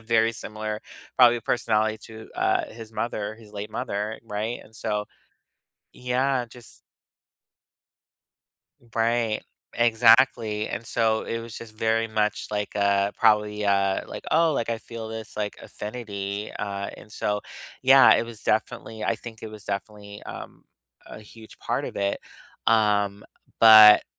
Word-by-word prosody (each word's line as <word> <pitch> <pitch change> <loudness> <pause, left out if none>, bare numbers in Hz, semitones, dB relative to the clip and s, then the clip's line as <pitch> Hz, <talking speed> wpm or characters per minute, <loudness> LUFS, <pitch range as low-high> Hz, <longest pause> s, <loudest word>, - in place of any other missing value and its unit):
very 115 -1 +3
similar 110 -1 -5 0.4
probably 120 -2 +6
personality 110 -2 0
to, 110 0 -11
uh, - - +1
his 115 -1 -11
mother, 110 -2 -3
his 110 -2 -16
late 105 0 -6
mother, 105 +2 -4
right? 110 +2 -4
And 110 - -20
so 105 -1 -3 0.9
Yeah, 125 0 0
just 120 0 -14 2.1
Right. 115 -1 +1 0.3
Exactly, 115 -2 +4
and 115 - -5
so 110 -2 +1
it 115 - -3
was 115 -2 -9
just 110 -2 -11
very 115 0 +1
much 105 -1 -1
like, 105 0 -3
uh, 100 0 +2
probably, 105 -2 +2
uh, 100 -1 +2
like, - - -8
"Oh, 165 0 +4
like, 120 -4 -2
I 115 - -2
feel 115 0 -8
this, 110 -1 -8
like, 105 -1 -3
affinity," 105 -2 -6
uh, 100 -1 -4
and - - -15
so, 105 -1 -2 0.4
yeah, 135 +1 +8
it - - +1
was 115 -2 -10
definitely 110 0 -2
I 115 +2 0
think 115 -1 -11
it 110 - -5
was 105 -1 -11
definitely, 100 0 -6
um, - - -9 0.4
a - - -10
huge 110 +1 -14
part - - -2
of - - -7
it, 100 0 -1 0.5
um, 105 -2 +2 0.3
but 110 -2 +9
110 Hz, 140 wpm, -25 LUFS, 105-115 Hz, 2.1 s, but